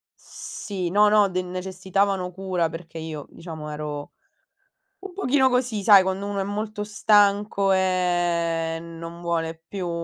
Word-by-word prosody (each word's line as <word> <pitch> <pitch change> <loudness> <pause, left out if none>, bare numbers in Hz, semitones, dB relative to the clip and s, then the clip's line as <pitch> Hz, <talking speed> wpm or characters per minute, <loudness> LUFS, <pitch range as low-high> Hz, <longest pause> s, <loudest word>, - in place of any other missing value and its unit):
sì, 185 -5 -6
no, 210 +3 +5
no, 210 -1 +5
de 185 0 -1
necessitavano 185 +1 -1
cura 185 -2 -1
perché 165 0 -9
io, 160 -2 -6
diciamo, 160 -3 -8
ero 150 -1 -5 0.9
un 390 -1 -9
pochino 265 -7 +3
così, 250 -4 0
sai 200 -1 +8
quando 190 +1 -2
uno 200 -1 -2
è - - +1
molto 210 +2 -4
stanco 205 -1 +3
e 175 -3 +1
non 165 0 -9
vuole 165 -1 -2
più 185 0 -4
185 Hz, 140 wpm, -24 LUFS, 170-205 Hz, 0.9 s, sai